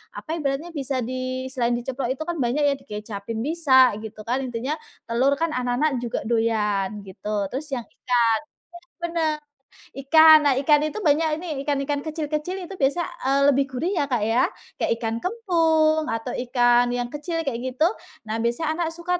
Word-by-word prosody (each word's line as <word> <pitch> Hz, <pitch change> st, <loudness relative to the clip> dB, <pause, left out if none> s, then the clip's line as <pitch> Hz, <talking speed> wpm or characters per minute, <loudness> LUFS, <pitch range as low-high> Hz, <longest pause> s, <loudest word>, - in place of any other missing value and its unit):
apa 315 Hz, -, -7 dB
ibaratnya, 290 Hz, +3 st, -2 dB
bisa 270 Hz, -4 st, -2 dB
di 255 Hz, +1 st, -4 dB
selain 240 Hz, -2 st, 0 dB
diceplok 255 Hz, +1 st, -3 dB
itu 275 Hz, -, -5 dB
kan 340 Hz, 0 st, -4 dB
banyak 255 Hz, +4 st, +1 dB
ya. 285 Hz, -1 st, +3 dB
Dikecapin 210 Hz, +1 st, -6 dB
bisa 270 Hz, -4 st, +5 dB
gitu 215 Hz, 0 st, -9 dB
kan. 245 Hz, +4 st, -1 dB
Intinya 255 Hz, +5 st, -3 dB, 0.3 s
telur 260 Hz, +4 st, +3 dB
kan 330 Hz, +2 st, -1 dB
anak-anak 255 Hz, +2 st, 0 dB
juga 240 Hz, -1 st, -3 dB
doyan 210 Hz, -3 st, 0 dB
gitu. 200 Hz, +1 st, -4 dB
Terus 285 Hz, +4 st, -4 dB
yang 240 Hz, -, -4 dB
ikan -, -, -31 dB
benar 240 Hz, -2 st, +4 dB, 0.7 s
benar. 335 Hz, -3 st, -1 dB, 0.5 s
Ikan. 315 Hz, +3 st, +7 dB
Nah, 275 Hz, -, +4 dB
ikan 295 Hz, +1 st, +5 dB
itu 425 Hz, +7 st, -5 dB
banyak 315 Hz, 0 st, +3 dB
ini, 355 Hz, -, -7 dB, 0.2 s
ikan-ikan 285 Hz, 0 st, 0 dB
kecil-kecil 310 Hz, +4 st, -3 dB
itu 390 Hz, -, -8 dB
biasanya, 285 Hz, +6 st, +1 dB, 0.2 s
eee, 275 Hz, +1 st, +3 dB
lebih 275 Hz, 0 st, +2 dB
gurih 275 Hz, +7 st, -2 dB
ya, 285 Hz, -, +1 dB
Kak, 245 Hz, -6 st, 0 dB
ya. 225 Hz, +4 st, +3 dB, 0.3 s
Kayak -, -, 0 dB
ikan 225 Hz, -1 st, -1 dB
kembung 325 Hz, -, +2 dB
atau 225 Hz, 0 st, -3 dB, 0.2 s
ikan 245 Hz, -1 st, +4 dB
yang 245 Hz, 0 st, -3 dB
kecil 330 Hz, +3 st, -3 dB
kayak 265 Hz, -6 st, -2 dB, 0.2 s
gitu. 310 Hz, +5 st, +4 dB, 0.4 s
Nah, 220 Hz, +1 st, -2 dB
biasanya 305 Hz, +8 st, -1 dB
anak 335 Hz, -2 st, 0 dB
suka 355 Hz, +1 st, -1 dB
270 Hz, 170 wpm, -24 LUFS, 240-315 Hz, 0.7 s, Ikan